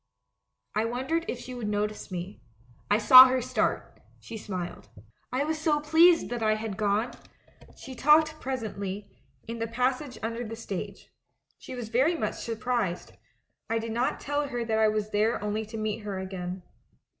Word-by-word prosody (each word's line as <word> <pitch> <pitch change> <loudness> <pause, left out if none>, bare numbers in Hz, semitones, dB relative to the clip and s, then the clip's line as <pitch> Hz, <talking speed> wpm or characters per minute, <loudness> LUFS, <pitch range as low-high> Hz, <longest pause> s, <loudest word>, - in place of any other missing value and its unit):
"I 215 +1 +1
wondered 265 +8 -1
if - - -3
she 255 - -8
would 240 -4 -4
notice 210 +1 -2
me. 185 +2 -6 0.5
I 205 - +4
saw 255 +4 +10
her 255 0 +1
start 245 - -2
— - - -30
she - - -9
smiled. 185 -5 -6 0.4
I 255 +3 0
was 315 +1 -2
so 305 -1 +2
pleased 325 +3 +5
that 240 -1 -3
I 215 -1 +3
had 215 -2 -4
gonel 210 +3 0 0.8
We 265 - -7
talked 310 +3 +4
presently, 210 -6 -5 0.3
in 230 0 -5
the 225 - -1
passage 255 +3 -1
un 225 +1 -1
der 235 +1 -4
the 225 -1 -6
stage. 205 -5 -7 0.5
She 255 - -8
was 240 -3 -6
very 270 +9 +2
much - - -2
surprised; 225 -5 -2 0.6
I 230 - +1
did 225 0 -4
not 240 +3 0
tell 290 0 -1
her 240 -3 -3
that 220 -1 0
I 220 - +5
was 215 0 -1
there 215 +3 +1
only 210 +1 -3
to 225 +1 -7
meet 215 0 -2
her 205 -3 -5
again. 185 -1 -5
225 Hz, 180 wpm, -28 LUFS, 210-255 Hz, 0.8 s, saw